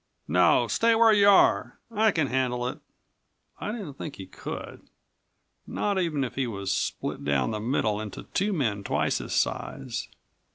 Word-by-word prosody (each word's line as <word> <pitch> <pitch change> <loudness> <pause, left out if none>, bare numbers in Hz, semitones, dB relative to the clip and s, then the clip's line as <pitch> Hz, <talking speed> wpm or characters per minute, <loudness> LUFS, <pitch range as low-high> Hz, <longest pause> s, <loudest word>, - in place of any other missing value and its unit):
"No, - - +4
stay 230 0 +3
where 225 -1 +6
you 200 -1 +6
are. 200 - +4
I 220 0 +3
can 160 -7 +1
handle 125 -2 0
it." - - -5 0.8
I 210 - -3
didn't 190 - -7
think 150 - -6
he 95 - -8
could, 95 - -8 0.9
not 200 -2 -1
even 160 -6 0
if 125 - -4
he 135 -2 -1
was 100 -3 -2
split - - -3
down 70 +5 +1
the 110 - -3
middle 110 -2 0
into 105 -2 -7
two 205 +3 +1
men 115 - -1
twice - - 0
his - - -5
size. - - -2
135 Hz, 165 wpm, -27 LUFS, -, 0.9 s, where